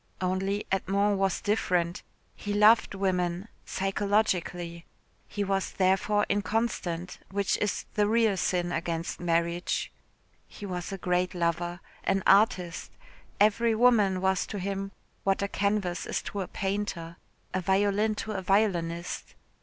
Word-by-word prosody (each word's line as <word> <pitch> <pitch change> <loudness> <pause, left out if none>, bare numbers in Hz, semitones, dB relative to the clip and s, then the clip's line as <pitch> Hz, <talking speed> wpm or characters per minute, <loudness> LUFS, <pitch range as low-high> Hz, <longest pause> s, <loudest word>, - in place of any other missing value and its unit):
Only 190 +2 -1
Edmond 200 +1 +1
was 195 -1 +1
different. 180 -5 0 0.3
He 205 - -4
loved 210 0 +5
women 185 0 -1 0.2
psychologically. 190 -4 -1 0.4
He 205 - -2
was 195 -1 -1
therefore 195 +2 +2
inconstant, 205 -5 -1
which 200 0 0
is 210 - -1
the 210 -1 +2
real 220 -2 +3
sin 175 -1 0
against 170 0 -3
marriage. 170 0 0 0.6
He 205 - -9
was 180 -2 -4
a 195 - -4
great 180 0 0
lover, 175 +1 -1 0.2
an 195 0 +1
artist. 195 -5 +3 0.5
Every 220 +2 +4
woman 215 -6 +4
was 190 0 +1
to 210 - -5
him 195 +1 -3 0.3
what 195 0 +1
a - - +1
canvas 200 -3 -1
is - - -2
to 200 - -4
a 185 - -4
painter, 190 -4 -3 0.4
a 185 - 0
violin 200 +3 +2
to 215 - -4
a 195 -2 -3
violinist. 180 -3 0
195 Hz, 130 wpm, -28 LUFS, 180-205 Hz, 0.6 s, loved